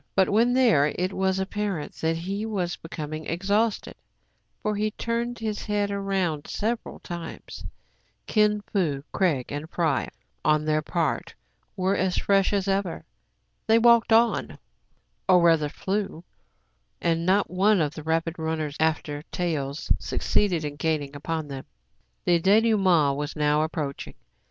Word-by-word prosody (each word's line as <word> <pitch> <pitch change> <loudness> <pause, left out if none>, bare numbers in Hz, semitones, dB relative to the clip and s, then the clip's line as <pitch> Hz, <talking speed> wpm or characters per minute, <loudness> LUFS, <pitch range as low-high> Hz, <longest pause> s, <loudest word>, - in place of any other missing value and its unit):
But, 190 -2 +3
when 230 +4 +3
there, 230 - +4
it 185 +2 -1
was 190 0 +1
apparent 190 -4 -3
that 160 0 0
he 195 +5 -3
was 190 -6 -2
becoming 155 -1 -6
exhausted; 200 +6 0 0.7
for 210 0 0
he 210 +1 0
turned 235 +2 -3
his 215 -2 -3
head 205 -1 0
round 195 -6 -1
several 225 +2 -3
times. 170 -2 -8 0.6
Kin 210 -1 +2
Fo, 165 -10 -1
Craig, 155 -10 0
and 145 +2 -5
Fry, 160 -6 0 0.3
on 155 0 +2
their 155 0 +2
part, 160 -1 -2 0.4
were 190 +1 +1
as 185 -1 0
fresh 195 -1 +2
as 200 -1 0
ever. 195 -2 -1 0.6
They 225 0 +6
walked 235 0 +5
on, 230 +1 +3 0.7
or 180 -1 +7
rather 165 -3 +4
flew; 190 0 -3 0.8
and 165 -1 0
not 190 +2 +2
one 195 +2 +3
of 150 -2 0
the 155 - -7
rapid 165 +2 -1
runners 160 -2 -2
after 155 -2 0
taels 155 -5 -3
succeeded 180 -7 0
in 145 -1 -5
gaining 150 -3 -1
upon 160 +1 -3
them. 135 -2 -7 0.6
The 170 -1 +3
dénoûme7it 190 -8 +4
was 145 0 -4
now 150 0 +2
approaching. 155 -3 -4
175 Hz, 140 wpm, -26 LUFS, 155-205 Hz, 0.8 s, or